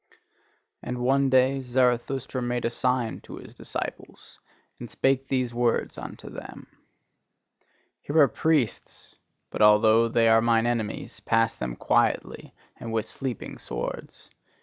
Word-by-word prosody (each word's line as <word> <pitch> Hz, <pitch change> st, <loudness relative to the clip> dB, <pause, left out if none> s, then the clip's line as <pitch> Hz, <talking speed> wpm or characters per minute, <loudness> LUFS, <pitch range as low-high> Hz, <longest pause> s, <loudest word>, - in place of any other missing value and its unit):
And 125 Hz, -, -4 dB
one 135 Hz, +2 st, +2 dB
day 130 Hz, +1 st, +3 dB
Zarathustra 125 Hz, +1 st, 0 dB
made 120 Hz, 0 st, -2 dB
a 115 Hz, -, 0 dB
sign 125 Hz, -2 st, -1 dB
to -, -, -10 dB
his -, -, -12 dB
disciples, -, -, -7 dB, 0.4 s
and 120 Hz, -, -8 dB
spake 135 Hz, +3 st, 0 dB
these 130 Hz, -3 st, -1 dB
words 120 Hz, -1 st, 0 dB
unto -, -, -9 dB
them: -, -, -9 dB, 1.4 s
"Here 145 Hz, -, -3 dB
are 145 Hz, -3 st, +7 dB
priests: 145 Hz, -1 st, -1 dB, 0.4 s
but -, -, -4 dB
although 110 Hz, +2 st, +6 dB
they 115 Hz, 0 st, +2 dB
are 115 Hz, 0 st, +5 dB
mine 115 Hz, 0 st, +2 dB
enemies, 115 Hz, -3 st, -3 dB
pass 115 Hz, 0 st, +1 dB
them 60 Hz, -, -5 dB
quietly -, -, 0 dB, 0.3 s
and 115 Hz, -, -7 dB
with 110 Hz, -1 st, -1 dB
sleeping 125 Hz, 0 st, -6 dB
swords! -, -, -6 dB
120 Hz, 130 wpm, -26 LUFS, 115-130 Hz, 1.4 s, are